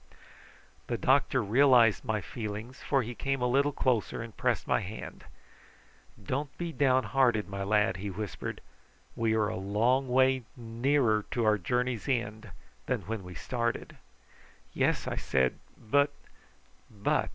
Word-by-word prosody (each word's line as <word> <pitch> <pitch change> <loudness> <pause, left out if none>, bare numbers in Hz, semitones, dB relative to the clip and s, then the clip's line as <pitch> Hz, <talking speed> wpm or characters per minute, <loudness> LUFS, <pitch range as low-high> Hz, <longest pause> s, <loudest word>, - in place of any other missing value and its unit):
The 120 - -1
doctor 130 -1 +2
realised 120 0 +5
my 110 -4 -1
feelings, 110 +6 -6
for 135 -2 +1
he 120 +2 -5
came 135 +3 -2
a 125 - 0
little 140 +4 +2
closer 120 -4 0
and 115 -1 -10
pressed - - 0
my - - +3
hand. 100 +4 -8 0.9
"Don't 135 +8 -4
be 170 -1 -4
downhearted, 130 -5 +2
my 100 0 -5
lad," 105 0 +2
he 100 +2 -4
whispered; 100 0 -5 0.5
"we 115 -1 +1
are 110 -1 +2
a - - -3
long 115 +7 +1
way 130 +1 +3 0.2
nearer 115 -1 +1
to 120 -2 -1
our 105 -1 +3
journey's 125 +6 -1
end 110 -4 -2 0.4
than - - 0
when 110 -2 -4
we 90 0 -10
started." 120 -2 -3 0.8
"Yes!" - - +1
I - - -3
said; 65 -1 0 0.2
"but 140 +6 +2 0.5
" 60 +1 -34
"But! 105 -3 0
115 Hz, 145 wpm, -29 LUFS, 105-130 Hz, 0.9 s, realised